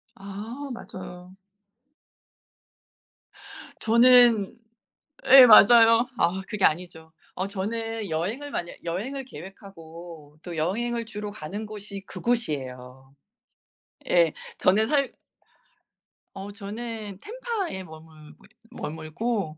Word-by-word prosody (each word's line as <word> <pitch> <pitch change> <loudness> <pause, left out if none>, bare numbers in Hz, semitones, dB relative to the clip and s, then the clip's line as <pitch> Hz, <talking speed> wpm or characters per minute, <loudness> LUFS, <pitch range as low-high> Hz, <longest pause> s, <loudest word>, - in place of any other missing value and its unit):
아 200 +4 -8 0.2
맞아요. 180 -4 -10 2.5
저는 235 -2 +5 0.7
예 265 -1 +10
맞아요. 230 +1 +7
아 175 +3 +1
그게 210 -3 -2
아니죠. 160 -1 -1 0.2
어 185 - -3
저는 220 +1 -4
여행을 210 - -3
만약 170 -10 -4
여행을 230 +12 -4
계획하고 165 - -12
또 175 -2 -7
여행을 230 +9 -1
주로 210 -1 -6
가는 205 +2 -7
곳이 205 -1 -8
그곳이에요. 135 - -4 1.0
예. 170 -3 +4 0.3
저는 210 +4 +3
살 280 0 0 1.2
어 195 +1 -8
저는 210 -1 -7
템파에 440 - -4
머물고 155 -2 -15 0.3
머물고 160 +3 -4
200 Hz, 190 characters per minute, -25 LUFS, 170-230 Hz, 2.5 s, 예